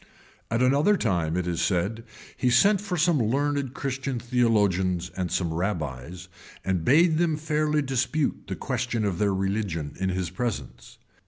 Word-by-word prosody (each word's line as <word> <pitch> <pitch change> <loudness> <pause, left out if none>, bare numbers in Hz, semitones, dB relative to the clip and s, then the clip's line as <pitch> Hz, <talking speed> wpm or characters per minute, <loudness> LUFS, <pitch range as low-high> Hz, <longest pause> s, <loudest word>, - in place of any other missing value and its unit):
[*] - - -31
At 115 +2 +1
another 145 +11 +4
time, 85 - 0
it 90 - -1
is 85 -2 -1
said, 95 +6 0 0.3
he 125 - +1
sent 195 +12 +4
for 200 -4 -3
some 165 -1 +3
learned 140 +3 0
Christian 135 -1 -3
theologians 100 -7 +1
and 90 -3 -3
some 85 -3 0
rabbies, 85 -2 -4 0.4
and 95 -3 0
bade 160 - +4
them 165 -3 +1
fairly 150 -1 0
dispute 135 +3 -1
the - - -3
question 120 -4 -2
of 95 -4 -2
their 105 -1 +2
religion 95 -5 -2
in 95 0 0
his 90 -2 -2
presence. 70 - -5
110 Hz, 160 wpm, -26 LUFS, 90-140 Hz, 0.4 s, another